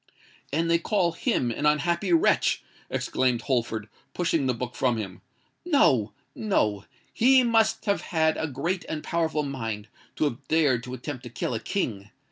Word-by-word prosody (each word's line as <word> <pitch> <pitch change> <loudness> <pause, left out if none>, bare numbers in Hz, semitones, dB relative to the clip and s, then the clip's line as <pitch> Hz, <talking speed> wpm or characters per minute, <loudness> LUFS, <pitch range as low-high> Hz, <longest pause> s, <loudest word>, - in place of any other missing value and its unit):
"And 165 +4 +1
they 170 0 +3
call 175 -1 +1
him 165 - 0
an 145 +6 0
unhappy 170 +5 +1
wretch!" 165 - +3 0.3
exclaimed 125 -2 0
Holford, 115 -4 -1 0.3
pushing 165 -5 +1
the 130 - +2
book 125 +1 -5
from 125 -2 +1
him: 95 -4 -6 0.4
"no—no! 125 - +1 0.3
He 260 +2 +5
must 225 -2 +2
have 200 -2 +1
had 160 -2 +1
a 160 - -2
great 165 +7 -2
and 155 -1 -4
a - - -12
powerful 160 -2 0
mind 115 -6 -4 0.3
to - - -1
have 140 -2 -2
dared 145 -7 +3
to 125 0 -5
attempt 130 +1 -6
to - - -6
kill 120 - -3
a 110 - -1
King! 105 - -3
145 Hz, 165 wpm, -26 LUFS, 120-170 Hz, 0.4 s, He